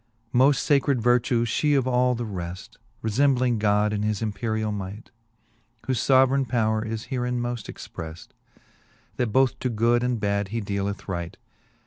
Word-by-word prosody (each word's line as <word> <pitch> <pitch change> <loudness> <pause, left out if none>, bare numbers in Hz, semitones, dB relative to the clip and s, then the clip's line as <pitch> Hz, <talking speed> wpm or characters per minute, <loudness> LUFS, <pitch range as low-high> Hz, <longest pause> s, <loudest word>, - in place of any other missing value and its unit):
X. 115 - -44 0.3
Moft 135 +3 +5
facred 140 -2 +3
vertue 120 0 +2
fhe 145 +5 +2
of 130 -1 0
all 125 0 +2
the 120 0 -4
reft, 90 -3 -7 0.2
Kefembling 125 +1 +2
God 105 0 +2
in 105 - -1
his 105 -1 -1
imperiall 110 0 -2
might; 100 +2 -7 0.7
Whole 130 - 0
foveraine 130 +2 +3
powre 110 -2 0
is 110 +3 -5
herein 125 -1 -1
moft 120 -2 -4
expreft, 80 0 -9 0.9
That 125 - +1
both 130 +3 +2
to 130 - -1
good 120 +1 +2
and 125 -2 0
bad 100 -1 0
he 115 +4 -3
dealeth 100 -1 -3
right. 85 -3 -4
115 Hz, 155 wpm, -25 LUFS, 105-125 Hz, 0.9 s, Moft